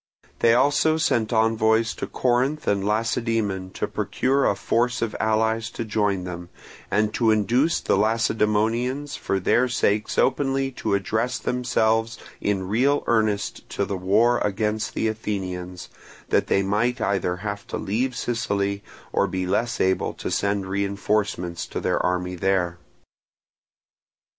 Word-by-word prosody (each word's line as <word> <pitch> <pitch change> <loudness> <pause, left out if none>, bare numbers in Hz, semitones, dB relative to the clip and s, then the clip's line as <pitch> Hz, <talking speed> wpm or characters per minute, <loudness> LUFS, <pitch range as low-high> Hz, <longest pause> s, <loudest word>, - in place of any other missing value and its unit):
They 115 0 +5
also 145 +4 +3
sent 115 -8 +1
envoys 110 0 +2
to - - -5
Corinth 130 +4 0
and 100 -1 +1
Lacedaemon 110 -2 -1
to - - -2
procure 135 +2 0
a - - +1
force 120 +2 0
of 115 - -3
allies 110 +1 +1
to 115 - -5
join 105 -3 0
them, 90 -1 -7 0.4
and 105 +2 +1
to 115 -2 +2
induce 120 +9 +2
the - - +1
Lacedaemonians 115 +5 +1
for 95 - -1
their 120 +7 +3
sakes 105 -3 0
openly 135 0 +1
to 100 - -1
address 110 +5 -1
themselves 115 -2 0 0.2
in 95 -2 -1
real 130 +8 +2
earnest 110 -3 0
to 100 - -1
the 100 - -3
war 105 +6 +3
against 105 +1 -1
the 110 - 0
Athenians, 90 -5 -4 0.4
that - - +2
they 100 - +2
might 115 +6 0
either 95 -4 0
have 100 +2 -5
to - - -4
leave 125 +5 -1
Sicily 100 -4 -1 0.3
or - - +2
be 95 0 -2
less 115 +6 -1
able 95 0 +1
to - - -5
send 100 -1 0
reinforcements 100 -2 -1
to - - -4
their - - 0
army 90 0 -1
there. 90 -1 0
110 Hz, 140 wpm, -24 LUFS, 100-120 Hz, 0.4 s, They